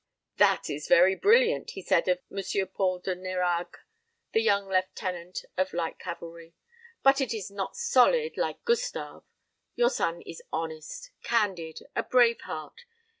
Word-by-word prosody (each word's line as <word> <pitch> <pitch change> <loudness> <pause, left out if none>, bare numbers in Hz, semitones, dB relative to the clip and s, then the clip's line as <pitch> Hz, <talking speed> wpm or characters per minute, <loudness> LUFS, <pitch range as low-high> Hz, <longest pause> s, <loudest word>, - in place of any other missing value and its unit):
"That - - +4
is 150 0 -5
very 185 +2 +6
brilliant," 465 - +3
he 190 - -6
said 170 - +2
of 180 -1 +3
M. 195 0 -2
Paul 185 -2 0
de 180 +1 -3
Nérague, 180 -1 -2 0.6
the 225 - +3
young 200 -3 +2
lieutenant 185 -1 -2
of 185 0 0
light 170 -1 -3
cavalry; 170 -1 -8 0.5
"but 270 +1 +5
it 240 -4 -1
is 205 -2 -6
not 200 -1 -4
solid, 470 0 +3
like - - -3
Gustave. 475 +1 -1 0.5
Your 485 0 +3
son 170 - -1
is 165 - -9
honest, 160 - -5
candid 190 -8 -1
a - - +2
brave 240 -2 +3
heart. 155 - -7
185 Hz, 145 wpm, -28 LUFS, 170-235 Hz, 0.6 s, very